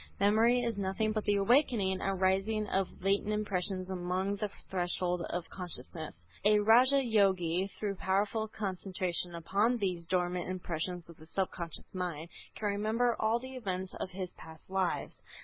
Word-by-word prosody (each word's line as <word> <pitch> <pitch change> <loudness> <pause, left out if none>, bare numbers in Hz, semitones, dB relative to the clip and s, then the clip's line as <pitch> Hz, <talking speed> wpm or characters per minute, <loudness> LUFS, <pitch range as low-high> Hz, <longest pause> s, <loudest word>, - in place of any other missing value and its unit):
Memory 225 +5 +4
is 230 -4 -1
nothing 200 +3 0
but 215 -1 -2
the 205 - +3
awakening 200 -3 +3
and 195 -1 -1
rising 195 +3 +2
of 190 -1 +1 0.2
latent 200 +2 +2
impressions 195 -3 -1
above 185 +2 -1
the 210 -1 -1 0.2
threshold 180 -1 0
of 175 -1 -3
consciousness. 160 - -5 0.2
A 210 +1 +6
Raja 250 +6 +6
Yogi, 190 -5 +2
through 200 -2 -2
powerful 205 +4 0
concentration 185 -4 -2
upon 205 +8 +1
these 180 -6 -1
dormant 180 0 0
impressions 180 -1 -3
of 170 -1 -13
the 155 - -14
subconscious 170 -2 -3
mind, 170 -3 -3 0.3
can 210 - -1
remember 220 +4 +1
all 220 +2 +3
the 260 +2 -8
events 190 -6 -3
of - - -3
his 185 -1 -5
past 160 +3 -12
lives. 190 -2 -1
190 Hz, 150 wpm, -32 LUFS, 180-215 Hz, 0.3 s, A